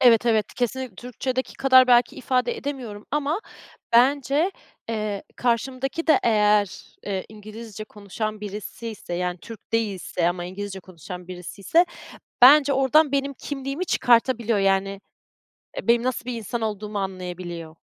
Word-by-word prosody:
Evet, 240 -2 +5
evet, 220 -3 +1
kesin 250 -2 -2
Türkçe'deki 250 +4 -4
kadar 260 -1 +6
belki 245 -1 +4
ifade 255 - 0
edemiyorum 250 - -6
ama 295 +6 0 0.5
bence, 280 +7 +3 0.4
eee, 215 -3 -2
karşımdaki 255 +6 -1
de 310 - +5
eğer, 210 -2 +4 0.4
eee, 195 -2 -2
İngilizce 215 0 -9
konuşan 215 +1 -5
birisiyse, 210 -1 -6
yani, 180 0 -2
Türk 225 +4 -12
değilse 195 -6 0
ama 175 0 -3
İngilizce 190 +1 -6
konuşan 180 0 -10
birisiyse, 195 - 0 0.6
bence 280 +2 +8
oradan 275 +2 +4
benim 280 0 0
kimliğimi 275 +5 -4
çıkartabiliyor, 235 -4 +3
yani, 195 0 +1 0.8
benim 235 0 +3
nasıl 255 -1 -2
bir 250 - -3
insan 230 +2 -4
olduğumu 210 -1 -3
anlayabiliyor. 180 -4 -6
225 Hz, 125 wpm, -24 LUFS, 200-260 Hz, 0.8 s, bence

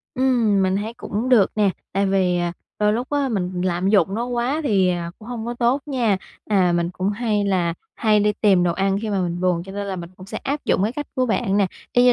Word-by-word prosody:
Ừm, 240 -6 +2
mình 190 0 +1
thấy 215 +3 -4
cũng 230 +1 -3
được 230 -7 +5
nè. 205 -2 +3 0.2
Tại 195 +1 +1
vì, 185 -2 +2
à, 175 0 -1 0.3
đôi 210 0 +3
lúc 245 +4 -3
á, 285 -2 +1
mình 185 -5 -2
lạm 180 +1 0
dụng 195 -2 +3
nó 230 +2 -1
quá 245 +5 -1
thì, 195 -8 +3
à, 170 -1 -3
cũng 220 - -12
hông 235 -2 -5
có 240 - -3
tốt 240 +3 +1
nha. 245 -8 +1 0.3
À, 185 -4 +3
mình 170 0 0
cũng 185 +2 -2
hay 210 -1 0
là 180 -4 +1 0.2
hay 215 -2 +3
đi 210 +1 +2
tìm 195 -4 +4
đồ 175 -1 +2
ăn 195 +2 0
khi 220 - -2
mà 200 -2 0
mình 175 0 -3
buồn, 180 -2 +1
cho 190 +2 -10
nên 200 0 -4
là 195 -1 -3
mình 170 -1 -7
cũng 185 - -12
sẽ - - -5
áp 285 +2 -3
dụng - - +2
cái 215 +3 0
cách 290 +2 -5
của 255 -1 +1
bạn 220 -3 0
nè. 200 -1 +3 0.3
Y 245 - +4
như 250 - +7
205 Hz, 260 wpm, -22 LUFS, 185-235 Hz, 0.3 s, như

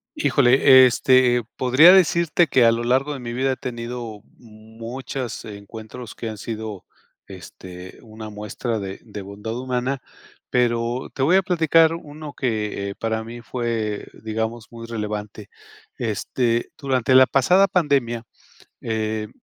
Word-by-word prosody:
Híjole, 130 - +6
este, 125 -1 +3
podría 140 +9 +7
decirte 170 -2 +3
que 130 -4 +4
a 115 - +5
lo 115 +1 -2
largo 135 +4 +1
de 140 - -6
mi 120 -1 -6
vida, 130 +2 0
he - - -3
tenido 120 -3 -6 0.2
muchos 115 +3 -8
encuentros 110 +3 -10
que 115 - -6
han 110 - -6
sido, 110 -2 -6 0.4
este, 90 -1 -11
una 110 -1 -10
muestra 105 +2 -4
de 95 -1 -6
de 105 -3 -8
bondad 105 +4 -7
humana. 130 +1 -2 0.5
Pero 120 0 0
te 135 - -3
voy 165 +7 +4
a 195 - +4
platicar 165 -2 +3
uno 150 -2 -9
que, 105 -5 -2
eh, - - -7
para 110 0 -3
mí 120 +1 -9
fue, 115 -3 -3 0.2
digamos, 110 +1 -3
muy 115 -1 -9
relevante. 105 -2 -5 0.5
Este, 120 +1 -1
durante 130 -3 0
la 130 0 +9
pasada 180 +11 +4
pandemia, 140 -11 0 0.6
eh, 110 -1 -3
120 Hz, 140 wpm, -22 LUFS, 110-130 Hz, 0.6 s, la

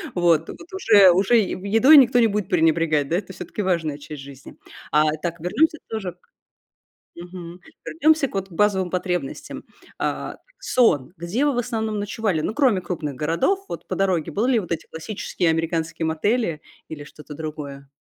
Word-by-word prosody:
вот 170 -2 +3
вот 345 +2 -11
уже 205 - +6
уже 195 +7 +3
едой 225 +8 +4
никто 250 -2 +6
не 230 - +5
будет 205 -2 -2
пренебрегать. 160 -4 +2
Да, 170 - +1
это 190 -1 -6
всё-таки 180 +4 -6
важная 165 -6 -1
часть 150 -1 -9
жизни, 135 -1 -12 0.3
а. 150 +1 +4 0.2
Так, 170 -1 -3
вернёмся 315 - +1
тоже 195 -6 -4
к 180 - -37 1.0
мгм, 175 0 -10 0.3
вернемся 315 -3 +2
вот 195 0 -3
к - - -18
базовым 190 -1 +1
потребностям. 180 -6 -4 0.3
А, - - -3 0.2
сон. 175 - +2
Где 180 - -1
вы 290 -3 +2
в - - -2
основном 220 -3 -2
ночевали? 205 -5 -1
Ну, 185 - -2
кроме 250 -10 +3
крупных 165 -5 -4
городов 170 - 0
вот - - -7
по - - -3
дороге, 185 -5 0
были 240 +6 +1
ли - - +4
вот 175 -4 -4
эти 165 - -4
классические 170 0 -2
американские 165 0 -2
мотели 165 +1 0 0.3
или 145 -2 -8
что-то 150 0 -12
другое? 145 -3 -7
180 Hz, 165 wpm, -22 LUFS, 160-220 Hz, 1.0 s, уже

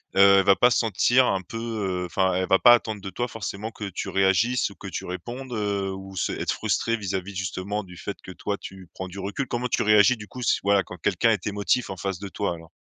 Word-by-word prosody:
heu, 100 0 +7
elle 95 - +1
va 100 -1 +6
pas 125 - +5
se - - +3
sentir 120 +4 +3
un 95 -5 0
peu, 95 +5 -8
heu 105 -6 -2
enfin 95 +1 +1
elle 95 0 0
va 95 - +4
pas 120 - +8
attendre 110 -3 0
de 95 - -6
toi 120 - -2 0.5
que 105 -2 -5
tu 95 - -5
réagisses 95 +6 +2
ou 100 - -14
que 100 - -9
tu 90 - -5
répondes, 120 +9 -6
heu, 100 -3 -1
ou 95 0 -8
se - - -1
être - - -2
frustrée 115 0 0
vis-à-vis 95 -1 -4
justement 95 +3 -3
du 90 -2 -13
fait 100 +3 -5
que 95 - -9
toi 100 +2 -3
tu 95 -2 -10
prends 95 - -6
du 95 +2 -10
recul? 100 +7 -3
Comment 120 +1 -2
tu - - 0
réagis 105 +4 +5
du 105 -1 -10
coup 125 - -9
si - - +2
voilà 100 -1 +3
quand 90 - -10
quelqu'un 110 +6 +2
est 100 -3 -1
émotif 105 +4 0
en 95 - -5
face 95 0 -3
de 100 0 -6
toi 100 -2 -2
alors? 80 -1 -12
100 Hz, 250 wpm, -25 LUFS, 95-110 Hz, 0.5 s, pas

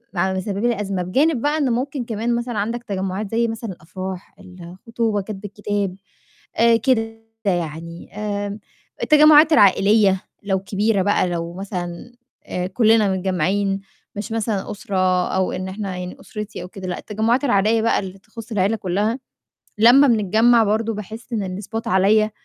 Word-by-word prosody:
ع 190 +2 +1
مسَببه 200 +5 -1
لي 215 -3 -1
أزمة. 195 -3 -2
بجانب 265 - +1
بقى 295 +2 +1
إن 275 -4 +1
ممكن 255 +1 -2
كمان 230 +1 -1
مثلًا 240 -2 -3
عندك 230 +3 -2
تجمُّعات 195 +1 -3
زي 230 +1 +1
مثلًا 225 -2 -5
الأفراح، 185 +4 -8
الخطوبة، 195 +4 -4
كَتب 205 +1 -8
الكِتاب 205 -2 -3 0.6
آآ 230 0 +5
كده 225 -1 0 0.2
يعني، 170 -1 -3
آمم 205 0 -3 0.4
التجمُّعات 305 +1 +7
العائليّة 200 -2 +4 0.2
لو 195 -2 0
كبيرة 200 +1 0
بقى 205 -2 +2
لو 170 0 -3
مثلًا 185 +3 -6 0.3
آآ 180 0 -3
كلّنا 215 -1 +3
متجمَّعين 190 +2 0 0.4
مش 210 +3 -5
مثلًا 220 -3 -2
أُسرة 185 -3 0
أو 190 0 +1
إن 185 +1 -4
إحنا 195 -2 -5
يعني 180 0 -6
أُسرتي 210 -3 -7
أو - - -7
كده 190 -3 -8
لأ، 180 - -3
التجمُّعات 225 +5 0
العائليّة 220 0 +3
بقى 230 - +2
اللي 190 0 -7
تخُص 225 +3 -12
العيلة 205 +2 +1
كلّها، 210 +5 -1 0.6
لمّا 250 +6 +7
بنتجمَّع 225 +1 +4
برضه 220 +2 0
باحس 220 +4 -9
إن 190 -3 -3
الspot 225 +2 -5
عليّا، 210 +3 +3
205 Hz, 150 wpm, -21 LUFS, 190-225 Hz, 0.6 s, التجمُّعات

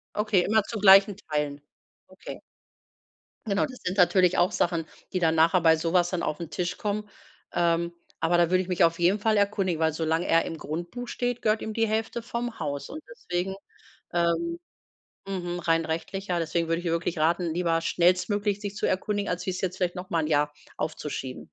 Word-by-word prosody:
Okay, 210 -3 +2
immer 215 +2 +3
zu 225 +2 -6
gleichen 195 0 +7
Teilen? 150 -6 -3 0.5
Okay. - - -10 1.1
Genau, 200 -2 +1
das 255 -3 -11
sind 185 +2 -3
natürlich 180 0 +4
auch 175 +1 +3
Sachen, 165 -2 0 0.3
die 185 - 0
dann 165 -2 +2
nachher 165 +3 +4
bei 160 -1 +6
so 165 +1 -2
was 175 -1 +3
dann 180 -2 -2
aufn 160 +1 -3
Tisch 180 0 -3
kommen. 210 0 -2 0.4
Ähm, 170 0 +1 0.3
aber 170 +2 +2
da 170 -1 +3
würde 185 0 +3
ich 185 - -10
mich 180 -2 +3
auf 165 +1 +2
jeden 180 +4 +3
Fall 215 +1 +2
erkundigen, 200 -5 +1
weil 160 -1 +2
solange 160 +2 -1
er 165 0 +4
im 165 - -5
Grundbuch 175 +12 -5
steht, 245 0 -2
gehört 215 0 +2
ihm 220 - -4
die 225 0 +1
Hälfte 225 +2 -2
vom 235 0 -4
Haus 145 -1 -3
und 310 +2 -8
deswegen 190 - -3 0.6
ähm, 175 - 0 0.7
mhm, 175 -2 -3
rein 165 -1 +1
rechtlich 180 +5 -4
ja, 175 -1 +1
deswegen 165 0 -1
würde 165 0 +1
ich 175 - -7
dir 170 - 0
wirklich 170 0 -1
raten, 165 +2 +1
lieber 165 -1 +1
schnellstmöglich 185 +5 +1
dich 205 0 -5
zu - - 0
erkundigen, 205 +2 -1
als 180 0 -2
wie - - +1
es 185 - -4
jetzt 185 0 -3
vielleicht 180 0 -1
noch 180 +1 -7
mal 165 - +1
'n - - -2
Jahr 150 -1 +2 0.2
aufzuschieben. 145 -4 -4
180 Hz, 200 wpm, -26 LUFS, 165-200 Hz, 1.1 s, gleichen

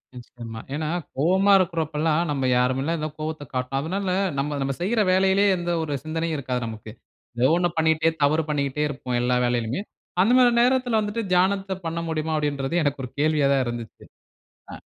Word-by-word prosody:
நிச்சயமா. 120 -2 -9 0.2
ஏனா, 155 0 -2 0.3
கோபமா 190 +7 +3
இருக்குற 175 -3 0
அப்போலாம், 155 +1 0
நம்ப 135 -2 -1
யாருமேல 140 +5 0
கோவத்த 155 -1 -4
காட்ட. 125 0 -3
அதனால 190 +5 -2 0.3
நம்ம, 145 +1 -1
நம்ம 135 0 -1
செய்யிற 215 +5 +1
வேலையிலேயே 190 +2 +3
எந்த 175 0 -2
ஒரு 150 - -3
சிந்தனையும் 160 0 -2
இருக்காது 125 -2 -3
நமக்கு. 110 -1 -8 0.5
ஏதோ 130 +3 +4
ஒண்ணு 175 0 +1
பண்ணீட்டே, 160 0 +3
தவறு 155 +3 +3
பண்ணீட்டே 145 0 -1
இருப்போம். 130 -3 -3
எல்லா 125 0 +1
வேலையிலுமே. 120 - -1 0.4
அந்த 225 +6 +4
மாரி 245 -1 +6
நேரத்துல 250 -2 +2
வந்துட்டு, 210 +2 -2
தியானத்த 190 +1 +1
பண்ண 165 +1 -2
முடியுமா 160 0 -2
அப்டின்றதே 145 +2 -1
எனக்கு 145 -1 -1
ஒரு 125 - -11
கேள்வியா 150 -2 +2
தான் 135 -1 +2
இருந்துச்சு. 120 -2 -7 0.7
அ - - -6
155 Hz, 165 wpm, -24 LUFS, 135-180 Hz, 0.7 s, மாரி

